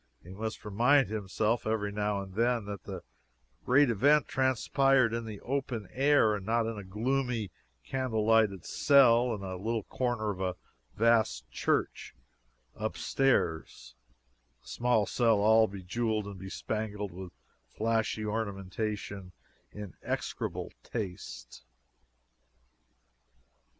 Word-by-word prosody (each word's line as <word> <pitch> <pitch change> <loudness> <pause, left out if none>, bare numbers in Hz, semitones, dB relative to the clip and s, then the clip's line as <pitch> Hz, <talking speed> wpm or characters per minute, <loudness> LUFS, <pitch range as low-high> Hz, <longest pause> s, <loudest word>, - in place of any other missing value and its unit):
He 90 - -12
must 110 +3 -5
remind 125 +7 +3
himself 110 +2 -1
every 105 -2 -1
now 105 -1 -1
and 95 -1 -11
then 115 +1 +1
that 100 -3 -7
the 95 -3 -7 0.6
great 130 0 +4
event 145 +7 +4
transpired 130 -1 +2
in 115 0 -3
the 105 -3 -7
open 125 -5 -3
air, 135 -5 +4
and 100 - -6
not 115 +3 +1
in 115 0 -3
a 105 - -7
gloomy, 115 +1 -1 0.3
candle 125 - -1
lighted 110 -5 +3
cell 125 -4 +5
in 100 - -8
a 95 -1 -5
little 110 +3 -2
corner 120 -3 -1
of 95 -1 -7
a 90 -1 -1 0.4
vast 115 - +2
church, - - -1 0.6
up - - -4
stairs 85 - 0 0.7
a - - -21
small 120 -3 +1
cell 115 +1 +2
all 110 +2 +5
bejeweled 105 +3 -2
and 100 -2 -8
bespangled 105 +1 -4
with 90 +1 -8 0.4
flashy 110 - -1
ornamentation, 100 -2 -4 0.4
in 105 -5 -8
execrable - - -4
taste. 95 - -7
110 Hz, 120 wpm, -30 LUFS, 100-120 Hz, 0.7 s, cell